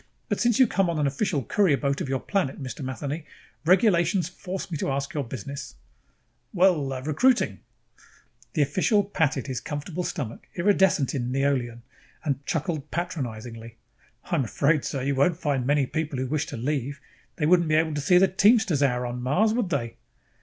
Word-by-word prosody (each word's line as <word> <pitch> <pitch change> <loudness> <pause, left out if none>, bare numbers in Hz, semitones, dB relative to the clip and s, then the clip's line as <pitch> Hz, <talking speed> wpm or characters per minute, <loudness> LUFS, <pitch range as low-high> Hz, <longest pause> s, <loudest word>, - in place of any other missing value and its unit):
But - - 0
since 240 -2 +3
you 260 - +7
came 195 -5 +1
on 170 - -1
an 150 - +1
official 140 +1 0
courier 175 - +2
boat 140 0 -1
of - - -3
your 135 -1 0
planet, 190 -7 -1
Mr. 135 +1 -6
Matheny, 140 +5 -4 0.4
regulations 180 -2 +3
force 185 0 -6
me 160 - -2
to - - -1
ask 140 0 -2
your 145 - -1
business." 130 +2 -7 0.8
"Well 175 -6 +4 0.2
recruiting." 235 - +2 0.9
The 155 - +3
official 185 +8 +2
patted 160 -9 0
his 130 -3 -3
comfortable 155 +6 -4
stomach, 135 - -5
iridescent 190 -6 +3
in 125 -2 -2
neolon, 130 -4 0 0.4
and 140 -2 -2
chuckled 155 -4 -2
patronizingly. 115 -9 -5 0.5
"I - - -8
am 140 - +2
afraid, 145 +6 +1
sir, 135 -2 -3
you 140 +1 0
won't 150 +5 +2
find 140 -7 -1
many 145 -1 +3
people 150 0 -3
who 130 - -1
wish 150 +3 -1
to - - -6
leave. 140 +3 -2 0.4
They 150 - -1
wouldn't 170 0 +4
be 155 - +3
able 160 0 +2
to 145 - -2
see 180 +6 +4
the 190 +2 +6
Teamsters 200 - +3
Hour 125 -3 +1
on 120 0 -4
Mars, 185 - +2
would 230 -5 0
they?" 120 -8 -2
145 Hz, 180 wpm, -26 LUFS, 135-180 Hz, 0.9 s, you